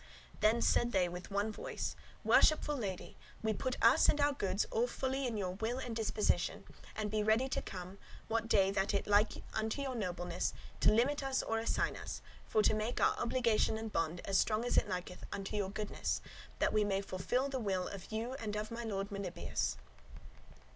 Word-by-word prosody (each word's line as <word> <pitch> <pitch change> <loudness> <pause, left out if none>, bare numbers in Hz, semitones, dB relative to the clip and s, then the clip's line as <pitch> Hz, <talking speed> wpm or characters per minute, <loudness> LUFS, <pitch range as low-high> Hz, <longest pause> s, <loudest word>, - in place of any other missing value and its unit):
Then 220 +3 +3
said 240 0 +3
they 185 -2 +3
with 180 +1 -7
one 200 +2 0
voice, - - -4 0.3
"Worshipful 300 -1 +5
lady, 195 -8 -5 0.3
we 220 0 +2
put 255 +5 -2
us - - +6
and 295 - +3
our 290 0 +3
goods 195 -5 0
all 235 +2 +2
fully 265 +2 -1
in 230 -3 -2
your 185 -3 -1
will 220 +6 -2
and 245 -3 -4
disposition, 220 -1 0 0.3
and 210 -1 -2
be 215 0 +1
ready 220 +5 +3
to - - -1
come, 185 +1 -8 0.3
what 225 0 0
day 195 -3 +4
that 195 0 0
it - - 0
like 205 +1 +3
unto 220 +5 -1
your 265 -2 -2
nobleness 175 -5 -2 0.2
to - - +5
limit 250 +7 +2
us 270 -1 0
or 225 0 0
assign 225 - 0
us, - - -6 0.3
for 215 - +3
to - - +4
make 215 +3 -1
our - - +4
obligation 230 -3 +2
and 220 -1 -5
bond, 165 +1 -1
as 195 -1 +3
strong 220 +2 +1
as 245 - 0
it - - +3
liketh 180 0 -4
unto 195 +1 -4
your 200 -2 0
goodness, 210 +1 -2 0.4
that - - +1
we 215 -1 +4
may 195 -1 0
fulfil 200 +8 -1
the 270 -2 -2
will 190 -5 -1
of 195 0 -8
you 225 +4 -2
and 210 -2 -3
of 215 +1 -3
my 235 +1 -4
lord 200 -3 -3
Melibœus." 195 -3 -2
215 Hz, 195 wpm, -35 LUFS, 195-235 Hz, 0.4 s, us